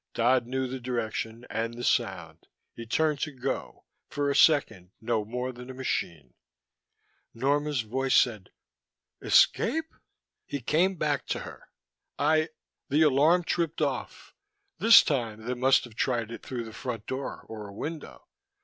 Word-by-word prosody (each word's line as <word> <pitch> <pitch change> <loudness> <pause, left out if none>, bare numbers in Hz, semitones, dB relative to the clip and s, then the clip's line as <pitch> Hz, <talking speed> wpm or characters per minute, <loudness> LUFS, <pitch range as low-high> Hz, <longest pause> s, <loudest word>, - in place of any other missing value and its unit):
Dodd 120 +1 +2
knew 130 +1 -1
the 130 +1 -5
direction, 115 -1 -4
and 115 +1 -3
the 120 - -7
sound. - - -1 0.3
He 115 -1 -9
turned 150 +4 +1
to 155 - -2
go, 135 0 -5 0.2
for 145 0 -1
a - - -1
second 110 - +3
no 110 -1 -1
more 125 +4 -4
than 125 +1 -11
a 130 - -7
machine. 80 - -3 1.0
Norma's 145 +2 +1
voice 130 +5 0
said: 110 -6 +2 0.7
"Escape?" 320 0 +3 0.5
He 140 - -4
came 170 +9 +1
back 150 -4 -1
to - - -2
her. - - -11 0.5
"I 155 +2 +2 0.4
the 150 +3 +4
alarm 155 +5 +4
tripped 165 -1 -1
off. - - -4 0.5
This 225 +1 +8
time 115 -7 -2
they 125 - -1
must 130 +2 +3
have 120 - -11
tried 115 -1 -1
it 115 - -7
through 125 -2 -5
the 110 -1 -10
front 115 -4 -5
door, 130 +1 -5
or 110 -2 -8
a - - -10
window. 150 +9 -7
130 Hz, 150 wpm, -28 LUFS, 115-145 Hz, 1.0 s, This